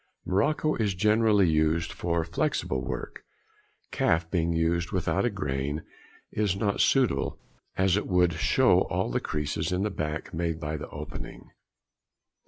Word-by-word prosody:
Morocco 150 Hz, +11 st, +1 dB
is 105 Hz, -4 st, 0 dB
generally 105 Hz, -1 st, +4 dB
used 80 Hz, +1 st, +1 dB
for 85 Hz, -1 st, -1 dB
flexible 80 Hz, -5 st, -1 dB
work; -, -, -6 dB, 0.7 s
calf, 80 Hz, 0 st, +1 dB
being 85 Hz, -2 st, +1 dB, 0.4 s
without 95 Hz, +3 st, 0 dB
a -, -, +3 dB
grain, 75 Hz, -, -3 dB, 0.5 s
is 105 Hz, -3 st, 0 dB
not 100 Hz, 0 st, 0 dB
suitable, 125 Hz, -, +2 dB, 0.4 s
as 95 Hz, -1 st, +3 dB
it 105 Hz, -, -1 dB
would 90 Hz, -2 st, +3 dB
show 80 Hz, -, +3 dB
all -, -, -1 dB
the -, -, +1 dB
creases 75 Hz, +2 st, -2 dB
in 90 Hz, +1 st, 0 dB
the 105 Hz, -, -1 dB
back 75 Hz, -3 st, -4 dB
made 80 Hz, 0 st, -2 dB
by 75 Hz, -1 st, -3 dB
the 75 Hz, -, -6 dB
opening. -, -, -8 dB
85 Hz, 140 wpm, -27 LUFS, 80-100 Hz, 0.7 s, generally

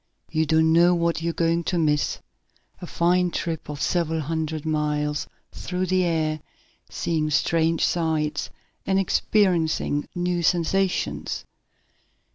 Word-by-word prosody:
"You 160 Hz, 0 st, +1 dB
don't 160 Hz, +1 st, +3 dB
know 175 Hz, +1 st, +5 dB
what 170 Hz, -1 st, 0 dB
you're 170 Hz, 0 st, 0 dB
going 165 Hz, 0 st, 0 dB
to 180 Hz, -, 0 dB
miss. 150 Hz, -3 st, +1 dB, 0.6 s
A 175 Hz, -, -6 dB
fine 180 Hz, +2 st, +2 dB
trip 165 Hz, -2 st, -4 dB
of 145 Hz, -1 st, -4 dB
several 165 Hz, -2 st, 0 dB
hundred 155 Hz, 0 st, -3 dB
miles 150 Hz, -1 st, -1 dB, 0.2 s
through 180 Hz, 0 st, -3 dB
the 185 Hz, 0 st, +2 dB
air, 160 Hz, -2 st, 0 dB, 0.5 s
seeing 155 Hz, -2 st, -1 dB
strange 165 Hz, +2 st, +2 dB
sights, 155 Hz, -3 st, -1 dB, 0.3 s
and 190 Hz, 0 st, +1 dB
experiencing 175 Hz, -6 st, +1 dB
new 175 Hz, 0 st, 0 dB
sensations." 180 Hz, +3 st, 0 dB
165 Hz, 120 wpm, -24 LUFS, 155-175 Hz, 0.6 s, know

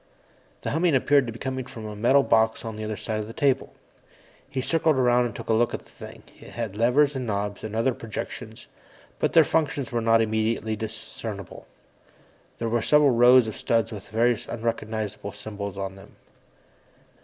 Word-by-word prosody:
The -, -, -2 dB
humming 165 Hz, 0 st, +2 dB
appeared 140 Hz, 0 st, +3 dB
to -, -, -3 dB
be 115 Hz, -, -9 dB
coming 130 Hz, 0 st, -4 dB
from 115 Hz, -4 st, -9 dB
a 105 Hz, -1 st, -6 dB
metal 130 Hz, +6 st, +4 dB
box 110 Hz, -1 st, +2 dB
on 110 Hz, -1 st, -5 dB
the 110 Hz, -, -6 dB
other 110 Hz, 0 st, -3 dB
side 110 Hz, +1 st, -3 dB
of 105 Hz, -, -4 dB
the 115 Hz, -, -9 dB
table. 135 Hz, -1 st, +1 dB, 0.8 s
He 135 Hz, -, -3 dB
circled 160 Hz, +3 st, +2 dB
around 125 Hz, -1 st, +3 dB
and 115 Hz, -4 st, -5 dB
took -, -, -8 dB
a -, -, +2 dB
look 120 Hz, +2 st, +2 dB
at -, -, -9 dB
the -, -, -21 dB
thing. -, -, -11 dB, 0.2 s
It -, -, -13 dB
had 115 Hz, -4 st, -4 dB
levers 135 Hz, +6 st, +3 dB
and 130 Hz, -2 st, -3 dB
knobs 100 Hz, -1 st, -3 dB
and 110 Hz, 0 st, -5 dB
other 115 Hz, +3 st, +2 dB
projections, 115 Hz, -2 st, -7 dB, 0.5 s
but -, -, 0 dB
their -, -, +8 dB
functions 145 Hz, -5 st, -1 dB
were 120 Hz, -1 st, 0 dB
not 115 Hz, 0 st, +4 dB
immediately 110 Hz, 0 st, 0 dB
discernible. 110 Hz, -2 st, -7 dB, 0.9 s
There 115 Hz, -, -2 dB
were 115 Hz, +1 st, +1 dB
several 150 Hz, +3 st, +5 dB
rows 120 Hz, 0 st, +6 dB
of 110 Hz, -, -5 dB
studs 115 Hz, -1 st, 0 dB
with 105 Hz, -3 st, -9 dB
various 120 Hz, +1 st, +1 dB
unrecognizable 110 Hz, -3 st, -3 dB
symbols 100 Hz, -1 st, -6 dB
on 95 Hz, -1 st, -4 dB
them. 95 Hz, +1 st, -15 dB
115 Hz, 190 wpm, -25 LUFS, 110-125 Hz, 0.9 s, their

